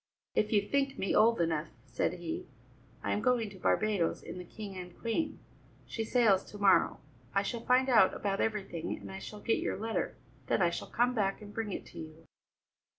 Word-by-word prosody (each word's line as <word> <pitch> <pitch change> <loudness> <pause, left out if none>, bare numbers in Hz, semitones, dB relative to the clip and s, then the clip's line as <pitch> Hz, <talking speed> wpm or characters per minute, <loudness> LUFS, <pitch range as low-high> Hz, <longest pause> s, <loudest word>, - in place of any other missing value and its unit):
"If 215 - +1
you 205 -2 +3
think 275 +1 +1
me 195 - 0
old 230 0 +5
enough," 165 -2 +1 0.2
said 130 +6 -1
he, 175 -2 -5 0.6
"I - - 0
am 205 - 0
going 240 -4 +2
to 190 - -12
Barbadoes 205 -4 +1
in 180 - -7
the - - -6
King 200 +2 -8
and 180 -1 -8
Queen. 300 +7 -1 0.5
She 225 - -3
sails 220 -4 +4
to 205 - -10
morrow. 200 -1 +4 0.3
I 195 - +4
shall 235 +3 -3
find 255 +2 +4
out 220 -7 +5
about 195 -1 -1
everything, 200 -7 -2
and - - -9
I 190 - -6
shall 210 +1 -8
get 225 - +1
your - - -1
letter, 225 +2 -2 0.3
then - - +2
I 175 -2 +4
shall - - -5
come 245 +2 +2
back 195 -4 0
and 205 -1 -11
bring 220 -2 -3
it - - -4
to - - -11
you." 160 0 -10
205 Hz, 205 wpm, -32 LUFS, 185-225 Hz, 0.6 s, old